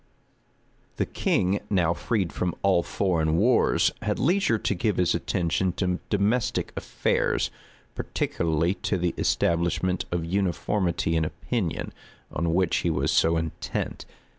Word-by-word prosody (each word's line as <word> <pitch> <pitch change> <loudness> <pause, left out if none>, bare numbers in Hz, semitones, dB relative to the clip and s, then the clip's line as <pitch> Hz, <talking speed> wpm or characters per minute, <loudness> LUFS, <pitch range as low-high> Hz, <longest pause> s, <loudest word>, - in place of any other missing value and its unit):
The - - 0
king, 95 +3 +1
now 90 -4 +2
freed 95 -1 -1
from 90 -1 -2
all 95 -3 +4
foreign 80 -4 0
wars, 115 +6 +3
had - - -1
leisure 175 - +2
to 105 - -1
give 100 +2 0
his 90 -2 +2
attention 90 +1 0
to 90 -1 -1
domestic 105 +4 0
affairs; - - 0 0.4
particularly 85 +1 0
to 95 - 0
the 90 -1 0
establishment 85 +2 +1
of 85 -2 -1
uniformity 90 -1 0
in 80 - +2
opinion, 95 +3 -3 0.4
on 85 +1 0
which 90 -2 +2
he 85 - 0
was 80 - 0
so 80 0 +3
intent. 80 -1 -4
90 Hz, 130 wpm, -26 LUFS, 85-100 Hz, 0.4 s, all